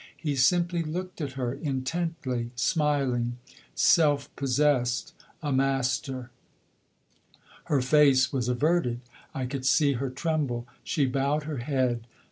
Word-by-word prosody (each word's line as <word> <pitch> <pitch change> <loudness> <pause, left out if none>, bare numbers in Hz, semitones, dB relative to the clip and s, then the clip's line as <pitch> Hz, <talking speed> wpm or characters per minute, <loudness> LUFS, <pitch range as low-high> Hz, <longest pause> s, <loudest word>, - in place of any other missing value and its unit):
He 150 -3 -2
simply 170 +6 +2
looked 180 +3 -5
at 140 -3 -3
her 125 -2 -2
intently, 135 -3 -3
smiling, 130 -5 0 0.4
self 145 -3 +3
possessed, 135 -2 +1 0.3
a 145 -2 0
master. 135 -1 0 1.3
Her 140 -3 +1
face 135 -1 +4
was 125 -3 -1
averted; 125 -2 +1 0.3
I 130 - -2
could 130 +1 -4
see 140 +2 +3
her 135 +1 -2
tremble; 140 -4 -2 0.2
she 150 -5 +1
bowed 140 +3 0
her 150 -1 -4
head. 120 -2 -1
135 Hz, 115 wpm, -27 LUFS, 125-150 Hz, 1.3 s, face